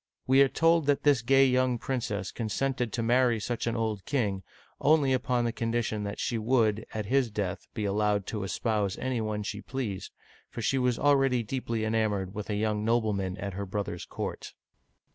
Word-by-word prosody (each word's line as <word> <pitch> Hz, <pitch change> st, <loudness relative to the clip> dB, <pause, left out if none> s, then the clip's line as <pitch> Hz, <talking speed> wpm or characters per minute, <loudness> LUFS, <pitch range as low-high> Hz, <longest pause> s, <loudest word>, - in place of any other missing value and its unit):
We 135 Hz, +1 st, +5 dB
are 140 Hz, -, +7 dB
told 165 Hz, -1 st, +3 dB
that 145 Hz, -1 st, +2 dB
this 145 Hz, -5 st, +4 dB
gay 135 Hz, +3 st, +5 dB
young 130 Hz, -1 st, +2 dB
princess 115 Hz, -6 st, -3 dB
consented 120 Hz, +2 st, -2 dB
to 115 Hz, -, -1 dB
marry 120 Hz, 0 st, +3 dB
such 120 Hz, +2 st, -3 dB
an 115 Hz, -, 0 dB
old 110 Hz, -4 st, -2 dB
king, 105 Hz, -9 st, 0 dB, 0.4 s
only 145 Hz, -2 st, +4 dB
upon 125 Hz, -2 st, +1 dB
condition 115 Hz, -2 st, -1 dB
that 100 Hz, 0 st, -5 dB
she 115 Hz, -, -1 dB
would, 110 Hz, -2 st, +1 dB
at 110 Hz, -2 st, -3 dB
his 130 Hz, +2 st, +2 dB
death, 100 Hz, -3 st, -3 dB
be 110 Hz, -3 st, -2 dB
allowed 105 Hz, 0 st, +1 dB
to 105 Hz, -3 st, -4 dB
espouse 100 Hz, +1 st, -1 dB
any 130 Hz, -3 st, -1 dB
one 105 Hz, -1 st, -2 dB
she 105 Hz, 0 st, -5 dB
pleased, 115 Hz, -9 st, -4 dB, 0.4 s
for -, -, -8 dB
she 135 Hz, +5 st, +2 dB
was 125 Hz, -2 st, +1 dB
already 135 Hz, -4 st, +3 dB
deeply 115 Hz, -1 st, -2 dB
enamored 105 Hz, -4 st, 0 dB
with 105 Hz, 0 st, -6 dB
a 105 Hz, -, 0 dB
young 105 Hz, 0 st, 0 dB
nobleman 105 Hz, -5 st, 0 dB
at 100 Hz, 0 st, -4 dB
her 100 Hz, +1 st, -4 dB
brother's 95 Hz, -3 st, -4 dB
court. -, -, -6 dB
115 Hz, 180 wpm, -28 LUFS, 105-130 Hz, 0.4 s, are